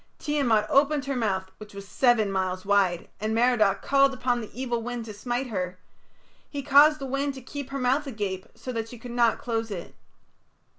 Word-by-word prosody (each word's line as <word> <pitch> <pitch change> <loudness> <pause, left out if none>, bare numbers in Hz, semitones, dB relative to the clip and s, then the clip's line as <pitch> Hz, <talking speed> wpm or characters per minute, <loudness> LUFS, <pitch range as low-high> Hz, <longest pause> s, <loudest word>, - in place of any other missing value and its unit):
Tiamat 260 -8 +1
opened 280 +1 +3
her 275 0 -2
mouth 190 -5 -1
which 210 -1 -11
was 200 0 -8
seven 235 -5 +2
miles 185 -1 -2
wide, 195 -4 +2
and 215 +1 -1
Merodach 225 -5 +3
called 275 -1 +3
upon 245 -1 0
the 220 - -8
evil 240 -2 -3
wind 240 0 -5
to 215 - -8
smite 245 +5 -3
her; 180 -3 -3 0.7
he 285 -1 -5
caused 295 +2 +6
the 275 - -6
wind 275 +1 -2
to 265 - -9
keep 280 +1 -7
her 275 - -4
mouth 270 +3 +1
agape 200 -6 -4
so 230 +3 -6
that 225 -2 -4
she 245 - -10
could 240 +1 -9
not 235 -1 +3
close 225 -2 -3
it. 185 -5 -7
240 Hz, 195 wpm, -26 LUFS, 205-270 Hz, 0.7 s, caused